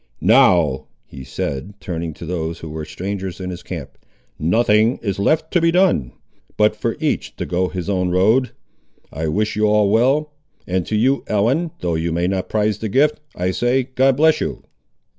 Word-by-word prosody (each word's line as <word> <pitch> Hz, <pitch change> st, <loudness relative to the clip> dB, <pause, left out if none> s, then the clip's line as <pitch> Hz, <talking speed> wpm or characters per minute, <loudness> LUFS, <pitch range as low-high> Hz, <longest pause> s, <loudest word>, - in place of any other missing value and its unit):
"Now," 90 Hz, -, +4 dB, 0.2 s
he 65 Hz, 0 st, -11 dB
said, 70 Hz, +7 st, -5 dB
turning 85 Hz, -4 st, -5 dB
to -, -, -9 dB
those 85 Hz, -1 st, -3 dB
who 80 Hz, -, -9 dB
were 75 Hz, 0 st, -5 dB
strangers 95 Hz, +1 st, -5 dB
in 90 Hz, -1 st, -4 dB
his 90 Hz, -, -7 dB
camp, -, -, -8 dB, 0.4 s
"nothing 110 Hz, -, +3 dB
is 100 Hz, -3 st, -2 dB
left 155 Hz, +9 st, +1 dB
to 175 Hz, -, +3 dB
be 165 Hz, -, +4 dB
done, 165 Hz, -, +2 dB, 0.5 s
but 105 Hz, 0 st, +3 dB
for 115 Hz, +2 st, -2 dB
each 155 Hz, -2 st, -2 dB
to -, -, -4 dB
go 90 Hz, +1 st, 0 dB
his 90 Hz, -1 st, -5 dB
own 90 Hz, -2 st, 0 dB
road. 110 Hz, +8 st, +3 dB, 0.6 s
I 80 Hz, +2 st, -3 dB
wish 105 Hz, +7 st, -1 dB
you 105 Hz, 0 st, +2 dB
all 105 Hz, -1 st, +3 dB
well; 135 Hz, +7 st, +2 dB, 0.3 s
and 90 Hz, -1 st, -2 dB
to 110 Hz, -, -1 dB
you, 130 Hz, +6 st, +2 dB
Ellen, 125 Hz, +12 st, +1 dB
though 85 Hz, -1 st, -1 dB
you 80 Hz, +1 st, -1 dB
may 85 Hz, +2 st, 0 dB
not 95 Hz, 0 st, -2 dB
prize 105 Hz, -1 st, 0 dB
the 110 Hz, -, -3 dB
gift, 145 Hz, +8 st, +2 dB, 0.2 s
I 90 Hz, +1 st, -1 dB
say, 125 Hz, +5 st, 0 dB
God 130 Hz, 0 st, +3 dB
bless 160 Hz, +1 st, +4 dB
you!" -, -, -4 dB
100 Hz, 185 wpm, -20 LUFS, 90-125 Hz, 0.6 s, Now